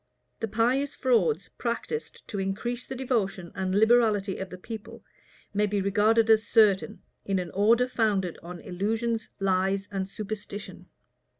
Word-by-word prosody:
The 225 - -2
pious 245 +6 +1
frauds 200 - +2
practised 250 - -4
to 200 - -3
increase 230 +6 -3
the 265 - -5
devotion 215 -9 -1
and 190 0 -2
liberality 215 -3 +3
of 190 - -5
the 185 - -8
people, 220 +3 -9 0.5
may 210 +1 +2
be 205 0 0
regarded 210 +3 +3
as 220 -1 +4
certain, 210 -1 +3 0.2
in 195 -1 0
an 180 -2 -3
order 230 +5 +4
founded 205 -8 0
on 175 0 -8
illusions, 225 +5 -2
lies, 195 +1 +1
and 190 -1 -3
superstition. 210 0 -7
210 Hz, 140 wpm, -27 LUFS, 195-230 Hz, 0.5 s, as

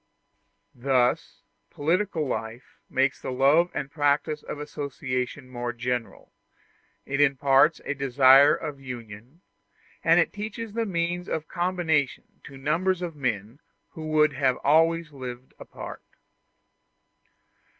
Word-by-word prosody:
Thus 125 -1 0 0.3
political 165 +1 0
life 115 0 -6
makes 135 +1 +1
the - - -5
love 140 +7 +4
and 140 -1 -5
practice 150 0 0
of - - -7
association 140 -3 -4
more 120 -1 -4
general; 120 0 -4 0.7
it 140 +1 -1
imparts 140 +2 +4
a - - -1
desire 135 +1 +6
of 145 -2 -6
union, 120 - -10 0.6
and - - +4
teaches 215 +1 -6
the 230 0 -1
means 175 -1 -2
of 160 0 -3
combination 175 -6 -1
to 135 - -11
numbers 170 +6 0
of 170 -3 -5
men 115 -2 -3 0.3
who 160 -2 -7
would 150 -1 +3
have 135 -2 +1
always 165 +2 +3
lived 130 -2 -8
apart. - - -9
140 Hz, 115 wpm, -26 LUFS, 130-165 Hz, 0.7 s, desire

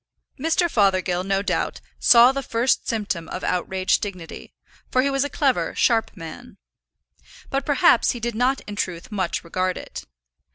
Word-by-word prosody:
Mr. 325 +2 +1
Fothergill, 185 - +1
no 195 +1 0
doubt, - - -2 0.2
saw 240 +1 +7
the 275 0 -3
first 245 -1 0
symptom 200 -7 -3
of 185 - -6
outraged 185 +1 0
dignity, 185 -5 -7 0.4
for 255 - +2
he 280 - +1
was 275 0 +1
a 285 - -3
clever, 270 -1 0
sharp 230 -2 +2
man. 175 +9 -10 0.9
But, 275 0 -2
perhaps, 275 -4 +4
he 240 - -1
did 235 +1 -3
not 250 +4 +1
in 205 - -8
truth 180 -3 -4
much 190 -4 -2
regard 185 +2 -2
it. - - -8
215 Hz, 160 wpm, -23 LUFS, 185-255 Hz, 0.9 s, saw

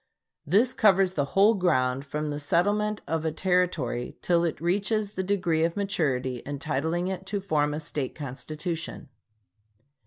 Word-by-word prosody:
This 220 - +3
covers 195 -3 +4
the 145 -6 0
whole 205 +3 +7
ground 135 - +1
from 150 +1 -3
the 145 - -3
settlement 205 +7 +1
of 160 +1 -1
a 160 - 0
Territory 170 -8 0
till 170 -1 +3
it 165 - -1
reaches 200 +4 0
the 190 - -3
degree 180 -4 +1
of 165 +2 0
maturity 130 -11 -1
entitling 150 +5 -2
it 190 0 -4
to 205 +1 -1
form 155 -7 +1
a 150 - -3
State 150 -3 -4
constitution. 155 +5 -5
170 Hz, 150 wpm, -27 LUFS, 150-190 Hz, -, whole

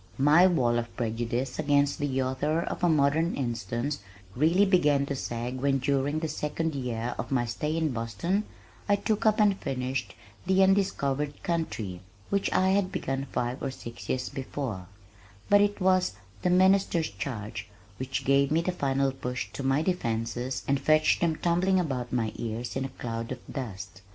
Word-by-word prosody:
My 150 +7 +6
wall 120 -9 +2
of 115 0 -7
prejudice 120 +3 -2
against 145 0 +2
the 135 -3 0
author 145 +5 0
of - - -5
A 175 - +5
Modern 155 +2 +2
Instance 120 +1 -2 0.4
really 165 +9 +4
began 150 -7 +3
to 140 - -3
sag 120 0 -4
when 135 +1 +2
during 140 +2 0
the 160 0 -1
second 155 +1 -2
year 125 -3 -3
of 115 - -3
my 125 -3 +2
stay 150 +7 -2
in 160 -3 +1
Boston, 120 - -1 0.4
I 205 - +6
took 215 +1 0
up 215 0 +3
and 205 -2 +4
finished 130 -2 -3 0.3
The 190 0 +5
Undiscovered 150 -7 +1
Country 110 - -2 0.3
(which 200 0 +1
I 185 0 +3
had 190 -1 +2
begun 135 +1 -2
five 125 +2 -2
or 135 - -1
six 115 -3 -9
years 125 -1 -1
before), 130 -8 -5 0.6
but 205 0 +7
it 205 0 +1
was 185 - +3 0.3
The - - +1
Minister's 185 - +3
Charge 105 -2 -5 0.3
which 130 +1 -3
gave 140 +1 +4
the 165 +2 +2
final 135 -5 +1
push 125 -1 -4
to - - -5
my 135 +3 +2
defenses 120 - -2
and 140 0 +2
fetched 155 +2 +3
them 165 -2 +2
tumbling 180 +3 +2
about 130 -8 -2
my 115 -3 0
ears 115 +1 -4
in 135 0 -1
a - - -4
cloud 115 -2 -5
of 130 - -3
dust. 100 -7 -7
140 Hz, 170 wpm, -28 LUFS, 120-165 Hz, 0.6 s, but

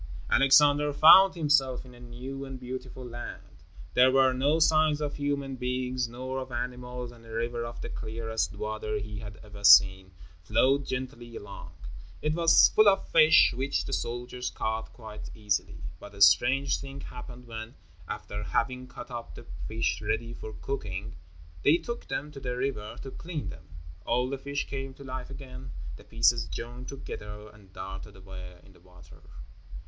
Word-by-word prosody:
Alexander 145 +2 +5
found 185 +6 +8
himself 140 -6 +2
in 125 - -13
a 120 - -15
new 125 +3 -7
and 135 -1 -7
beautiful 130 0 -7
land. 120 0 -9 0.3
There 130 +1 +6
were 130 0 +4
no 140 +5 +2
signs 155 -2 +4
of 145 -1 -2
human 140 -2 -2
beings, 125 0 -1
nor 130 +3 -5
of 130 -1 -7
animals, 125 0 -5
and 120 -1 -16
a 115 - -15
river 115 +1 -2
of 120 0 -7
the - - -5
clearest 110 -4 -3
water 110 +1 -3
he 105 0 -6
had 105 -3 -9
ever 105 -1 -12
seen, 95 -2 +7 0.3
flowed 130 +9 +2
gently 125 -2 -5
along. 100 -2 -9 0.5
It 150 0 0
was 165 0 +6
full 215 -1 +7
of 195 -1 0
fish 160 -1 +6
which 135 +3 -1
the - - -5
soldiers 120 +8 -3
caught 110 0 -3
quite 110 -3 -9
easily. 105 -2 -2 0.2
But 100 0 -12
a 100 - -10
strange 135 +6 +4
thing 140 0 -8
happened 125 0 -9
when, 115 0 -8 0.3
after 105 0 -5
having 125 - -1
cut 120 0 -10
up 120 -1 -7
the - - -11 0.2
fish - - -1
ready 115 0 -2
for 110 - -8
cooking, 105 -6 -5 0.5
they 150 - +5
took 235 +5 -6
them 145 +3 -4
to 140 - -9
the 125 -2 -4
river 120 -4 -3
to 135 - -7
clean 165 - -5
them. 75 0 -11 0.4
All 125 +2 0
the 140 - -3
fish 140 +1 -3
came 135 -1 -5
to 140 - -12
life 130 -1 -6
again; 65 +1 -9 0.3
the - - -13
pieces 115 0 +2
joined 120 +2 -7
together 105 -6 -8
and 100 -3 -19
darted 95 +1 -8
away 95 -2 -10
in 95 - -18
the - - -21
water. 90 0 -17
125 Hz, 170 wpm, -28 LUFS, 110-135 Hz, 0.5 s, found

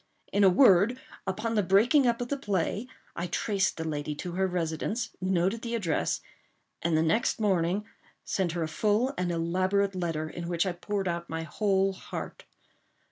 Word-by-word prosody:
In 200 - +4
a 195 - +8
word, 205 +3 +5 0.3
upon 215 +4 -2
the 215 - +3
breaking 230 - +4
up 235 0 +1
of 245 - -3
the 285 - 0
play, 205 +1 -1 0.3
I 175 - -3
traced 195 +2 0
the 160 - -3
lady 150 -1 -3
to 175 +4 -5
her 190 +2 +1
residence, 180 +6 -2
noted 185 +4 +1
the 235 0 -3
address, 180 -9 0 0.6
and 165 -2 +2
the 160 - +3
next 220 +10 +1
morning 190 -1 +1 0.4
sent 180 -4 -1
her 170 -1 -1
a - - -1
full 215 - +1
and 180 -5 -1
elaborate 185 +4 +1
letter, 165 -4 -2
in 170 +2 -6
which 170 +1 +1
I 185 - 0
poured 195 +2 -3
out 170 0 -3
my 160 0 -3
whole 195 +3 +1
heart. - - -7
190 Hz, 180 wpm, -28 LUFS, 170-210 Hz, 0.6 s, a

